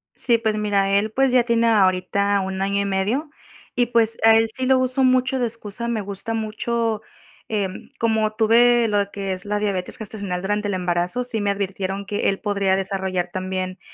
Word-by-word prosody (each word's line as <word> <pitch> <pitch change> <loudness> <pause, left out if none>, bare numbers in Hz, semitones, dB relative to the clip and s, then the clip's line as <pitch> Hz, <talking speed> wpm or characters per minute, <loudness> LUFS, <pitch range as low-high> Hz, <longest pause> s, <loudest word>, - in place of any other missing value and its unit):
Sí, 235 -2 +4
pues 220 -2 -1
mira, 200 -2 +1
él, 205 +2 +1
pues, 265 +3 +2
ya 250 -1 +4
tiene 235 -1 +2
ahorita 200 -1 +2
un 190 0 -4
año 200 +1 0
y - - -1
medio, 205 +10 -1 0.4
y, 245 -1 +2
pues, 230 -1 +3
a 225 0 +7
él 225 0 +3
sí 260 0 -3
lo 265 0 +5
uso 255 +1 +1
mucho 255 +1 +2
de 245 - +1
excusa, 230 0 -5
me 230 -2 -1
gusta 200 +3 -5
mucho, 225 0 -2 0.5
em, 200 -4 -3
como 220 -2 +1
tuve 235 +2 +4
lo 205 -2 0
que 195 -1 -3
es 185 -1 -4
la 210 0 -1
diabetes 200 -3 -2
gestacional 200 -4 -5
durante 205 +1 -1
el 200 - -1
embarazo, 180 +6 -1
sí 235 -3 0
me 205 - 0
advirtieron 195 0 -3
que 205 +1 0
él 195 - -2
podría 200 -2 +1
desarrollar 190 -2 -2
también, 185 0 -4
205 Hz, 195 wpm, -22 LUFS, 195-230 Hz, 0.5 s, a